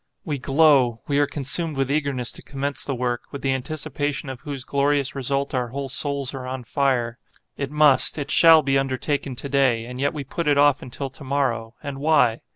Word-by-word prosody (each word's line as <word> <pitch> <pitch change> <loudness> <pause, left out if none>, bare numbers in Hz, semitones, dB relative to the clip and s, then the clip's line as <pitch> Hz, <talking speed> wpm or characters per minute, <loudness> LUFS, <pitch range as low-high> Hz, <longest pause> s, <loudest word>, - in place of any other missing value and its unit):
We 150 -5 -3
glow, 135 -4 +3
we 145 0 +1
are 145 - +3
consumed 150 +3 -1
with 135 0 0
eagerness 140 -5 -1
to - - -11
commence 140 0 -3
the 135 - -2
work, 120 -1 -2
with 140 - -7
the 135 - +1
anticipation 145 0 -3
of 130 -2 -7
whose 140 -3 -5
glorious 140 0 0
result 140 +1 -2
our 125 -2 0
whole 135 +3 -5
souls 140 +1 -2
are 130 -2 -6
on 130 0 -5
fire. 125 -2 0 0.4
It 140 -2 -4
must, 150 -1 +4
it 145 -1 -3
shall 165 -2 +7
be 135 0 +2
undertaken 135 0 -2
to 140 - -4
day, 130 -5 +2
and 125 +1 -8
yet 140 +3 0
we 145 - -4
put 165 +5 -4
it 145 -1 +3
off 145 -1 +4
until 130 +2 -5
to 140 - -11
morrow; 130 -4 -1
and 140 -2 -5
why? 145 -6 +3
140 Hz, 205 wpm, -23 LUFS, 130-145 Hz, 0.4 s, shall